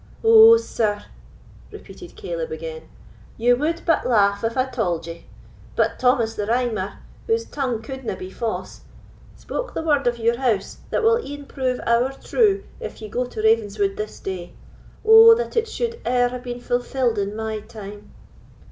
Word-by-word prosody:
"Oh, 450 0 +8
sir," 215 - -2 0.7
repeated - - -12
Caleb - - -5
again, 475 0 -7 0.5
"you 245 +2 +4
would 320 +6 -2
but 330 - +2
laugh 200 -3 +2
if 225 +1 -2
I 255 - +3
tauld 190 -11 -2
it; 170 0 -9 0.5
but - - 0
Thomas 250 -3 +2
the 205 -2 -4
Rhymer, 225 -5 -1 0.3
whose 455 0 +1
tongue 250 -6 -3
couldna 265 -4 -5
be 185 0 -8
fause, 230 +1 -5 0.5
spoke - - -6
the - - -2
word 290 -5 +1
of 240 0 +1
your 235 +1 +1
house 235 -7 -1
that - - -1
will 455 +1 +3
e'en 285 0 -8
prove 255 -2 -2
ower 240 +3 +2
true 400 - +1 0.2
if 470 - -7
you 215 - -8
go 250 +4 -1
to 220 -3 -6
Ravenswood 205 -3 +2
this 210 0 -6
day. 180 -2 -6 0.5
Oh, 450 +1 +9
that 480 +1 -4
it 455 0 +1
should 465 0 -4
e'er 245 0 +2
have 250 0 -6
been 245 0 -5
fulfilled 245 -2 -1
in 200 +1 -2
my 220 0 -3
time!" 205 -1 -11
245 Hz, 165 wpm, -22 LUFS, 215-330 Hz, 0.7 s, Oh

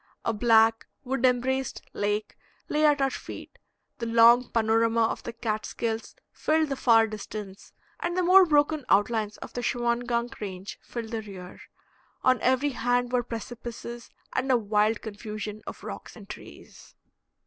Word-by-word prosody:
A 230 - +1
black, 225 0 +4 0.2
wood 265 -1 -2
embraced 260 +1 -1
lake 210 +1 -2 0.3
lay 305 0 +3
at 290 -2 +3
our 270 - +2
feet; - - -9 0.4
the 230 - -3
long 235 +2 +6
panorama 230 0 +2
of 225 - -1
the - - -6
Catskills 225 0 -3 0.2
filled 315 -1 +1
the 275 - -1
far 230 -4 +5
distance, 210 -2 -8 0.3
and 345 +1 -2
the 365 - +2
more 375 +2 +8
broken 295 -1 +2
outlines 210 0 +2
of - - -10
the 245 - -3
Shawangunk 240 0 -1
range 190 -1 -6
filled 230 -2 -7
the 225 -1 -2
rear. 190 -4 -10 0.6
On 255 -1 +3
every 260 +3 +2
hand 245 0 0
were 250 -1 +2
precipices 235 0 -7 0.2
and 260 +1 0
a 250 - +5
wild 210 0 +1
confusion 215 0 -6
of - - -8
rocks - - -8
and - - -12
trees. - - -12
235 Hz, 150 wpm, -27 LUFS, 220-250 Hz, 0.6 s, more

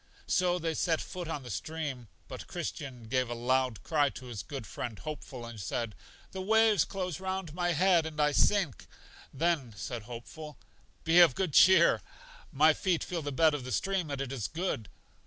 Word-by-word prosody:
So 180 -1 +2
they 165 -2 -2
set 160 0 +1
foot 180 -2 -6
on 150 -4 -4
the 125 - -7
stream, 140 - -4 0.2
but - - -8
Christian 130 -5 -5
gave 125 +2 -1
a 120 - -3
loud 125 -1 0
cry 145 -3 +2
to 130 - -10
his 120 -5 -6
good 135 0 -7
friend 115 -1 -6
Hopeful, 145 -5 -7
and 115 -2 -9
said: 105 +4 -3 0.4
The 190 - -5
waves 220 -2 +4
close 185 -3 -4
round 190 -4 -4
my 175 0 0
head, 170 0 +3
and 155 -1 -8
I 150 0 +4
sink. 180 - +2 0.4
Then 140 -7 0
said 120 +2 -5
Hopeful: 125 +7 -9 0.5
Be 165 +2 +5
of 170 -7 +7
good 185 -6 -1
cheer; 175 +1 +6 0.5
my 155 +2 +5
feet 175 0 0
feel 175 -2 -3
the 145 -1 -4
bed 155 +3 +4
of 145 -3 -3
the 130 - -6
stream, 190 -2 -1
and 140 -1 -3
it 135 -2 -3
is 125 -7 -3
good. 155 - -3
150 Hz, 190 wpm, -30 LUFS, 125-175 Hz, 0.5 s, of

